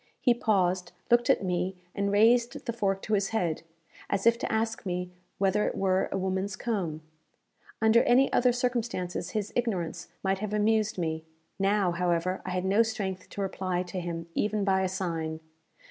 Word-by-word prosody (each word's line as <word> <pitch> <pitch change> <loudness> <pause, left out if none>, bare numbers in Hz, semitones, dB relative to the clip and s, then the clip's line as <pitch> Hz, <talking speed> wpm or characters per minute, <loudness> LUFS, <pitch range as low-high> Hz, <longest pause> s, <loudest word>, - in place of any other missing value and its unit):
He 245 - +4
paused, 185 -6 +1 0.2
looked 240 0 +4
at - - +4
me, 180 +1 -1 0.2
and 200 0 0
raised 235 +3 +3
the 235 - -2
fork 195 -4 -1
to 215 - -2
his 200 -1 +2
head, 175 -8 -1 0.5
as 200 0 -1
if 230 0 +5
to - - -2
ask 225 0 -1
me 180 -2 -3 0.3
whether 200 +2 +2
it - - -3
were 190 -1 +1
a - - -1
woman's 190 +1 -1
comb. 175 -10 -3 0.8
Under 220 +1 +6
any 260 +3 +4
other 250 0 +4
circumstances 235 -8 -2
his 210 -1 -3
ignorance 180 -8 -2 0.2
might 190 0 +1
have 210 0 -3
amused 215 0 +2
me; 160 -2 -2 0.4
now, 195 -1 +2
however, 175 +1 0
I - - -5
had 185 0 -1
no 200 +4 +4
strength 195 -5 -2
to 200 - -5
reply 185 -2 -1
to 185 +1 -5
him 170 -1 -4
even 210 +2 0
by 190 -1 +2
a 190 - 0
sign. 165 -4 -3
195 Hz, 175 wpm, -28 LUFS, 180-220 Hz, 0.8 s, Under